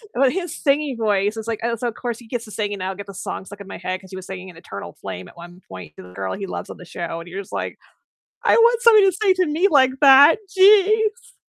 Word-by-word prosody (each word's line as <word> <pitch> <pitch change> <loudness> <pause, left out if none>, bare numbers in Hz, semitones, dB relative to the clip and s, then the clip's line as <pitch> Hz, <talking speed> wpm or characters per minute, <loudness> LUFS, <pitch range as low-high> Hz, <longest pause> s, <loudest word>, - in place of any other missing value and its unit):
But 265 0 +3
his 355 -3 -4
singing 280 -2 0
voice 210 -1 0
is 220 0 -6
like, 230 -2 -3
"Oh, 235 0 0
so 240 +2 -4
of 235 - -3
course 240 -3 -4
he 235 - -15
gets 235 0 -5
to 215 - -13
sing, 205 -1 -3
and 200 - -6
now 185 0 -3
I'll 190 - -5
get 200 +1 -8
the 195 - -11
song 190 - -6
stuck 205 +1 -11
in 200 - -11
my - - -8
head," 185 +1 -4
'cause 190 - -16
he 190 - -9
was 185 -1 -8
singing 190 0 -8
an 175 - -14
Eternal 100 - -9
Flame 90 -1 -7
at - - -18
one 175 +1 -13
point 90 -5 -11
to - - -10
the 90 0 -15
girl 95 0 -4
he 195 -1 -6
loves - - -6
on - - -9
the 180 - -13
show, 170 -1 -6
and 170 - -11
you're 190 +3 -5
just 195 - -15
like, - - -4 0.7
"I - - +4
want 470 0 +4
somebody 440 -4 +6
to 385 - +4
sing 385 +1 +2
to 365 0 +1
me 320 +6 +2
like 265 -4 +4
that, 280 +5 +7
geez." 430 +4 +3
220 Hz, 290 wpm, -21 LUFS, -, 0.7 s, that